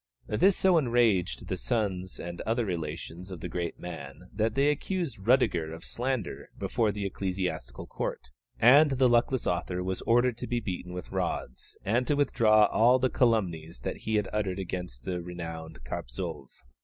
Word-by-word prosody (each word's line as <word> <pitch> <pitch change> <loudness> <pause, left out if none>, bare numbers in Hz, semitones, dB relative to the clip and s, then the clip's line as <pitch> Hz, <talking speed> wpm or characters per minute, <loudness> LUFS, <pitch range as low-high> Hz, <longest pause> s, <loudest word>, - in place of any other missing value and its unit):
This 185 - +3
so 185 -3 +5
enraged 115 - +2
the - - -2
sons 95 -6 -1
and 85 0 -6
other 115 +1 0
relations 85 0 -5
of 90 -3 -7
the - - -5
great 85 -2 -4
man 85 0 -8
that 110 +2 0
they 140 +2 +4
accused 170 - -3
Rüdiger 95 -8 +2
of 80 - -11
slander 125 -4 -3
before 115 -3 +1
the 100 0 -4
ecclesiastical 90 -11 -3
court, 65 - -5 0.3
and 140 +6 +7
the 130 -1 +3
luckless 120 +1 +2
author 90 +1 -1
was 95 0 -2
ordered 120 0 +3
to - - -4
be 120 - 0
beaten 90 -4 -5
with 90 -1 -7
rods, 60 - -3
and 120 +5 +1
to 145 - +2
withdraw 110 -7 +5
all 120 +5 +4
the 130 0 +1
calumnies 85 - 0
he 110 - -2
had 105 - +1
uttered 100 -3 -1
against 90 -9 -5
the 90 +3 -3
renowned 80 -6 -7
Carpzov. - - -5
100 Hz, 165 wpm, -29 LUFS, 85-120 Hz, 0.3 s, and